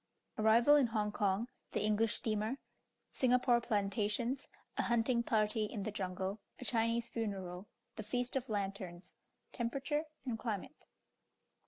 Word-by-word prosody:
ARRIVAL 235 +7 +6
IN 275 -4 +4
HONG 215 -2 0
KONG 205 +2 +1 0.3
THE - - +1
ENGLISH 215 +1 +2
STEAMER 220 +3 -1 0.5
SINGAPORE 250 -1 +4
PLANTATIONS 215 +4 0 0.3
A - - +6
HUNTING 235 +1 +2
PARTY 215 -1 +2
IN 210 -1 -4
THE 215 - -2
JUNGLE 190 0 -3 0.2
A 255 - -6
CHINESE 230 0 +1
FUNERAL 195 -4 -4 0.3
THE - - -3
FEAST 245 +4 -2
OF 265 -2 -1
LANTERNS 195 -3 -4 0.4
TEMPERATURE 275 +5 -1 0.2
AND 235 -4 -2
CLIMATE. 230 +6 -4
220 Hz, 130 wpm, -35 LUFS, 205-240 Hz, 0.5 s, ARRIVAL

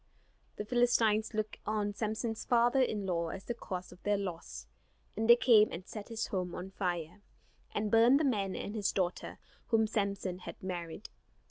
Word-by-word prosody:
The 210 - -5
Philistines 225 -2 +2
looked 215 0 -2
on 210 -1 -1
Samson's 220 +1 -3
father 240 +2 +3
in 215 -5 0
law 170 -3 0
as 190 +4 -6
the 240 - -2
cause 185 -5 -6
of - - -15
their 205 0 +1
loss; 175 - -6 0.5
and 225 +2 -1
they 235 - +11
came 230 -3 +5
and 180 +2 -6
set 210 -2 -7
his 225 -1 -2
home 180 -3 -3
on 190 +2 -6
fire, 175 -1 -3 0.5
and 210 0 -2
burned 235 +5 +6
the - - +1
man 205 -9 0
and 205 - -5
his 210 -3 0
daughter 185 -2 -2 0.3
whom 225 -2 +3
Samson 200 -4 -2
had 170 -2 -8
married. 175 0 -5
210 Hz, 175 wpm, -32 LUFS, 185-225 Hz, 0.5 s, they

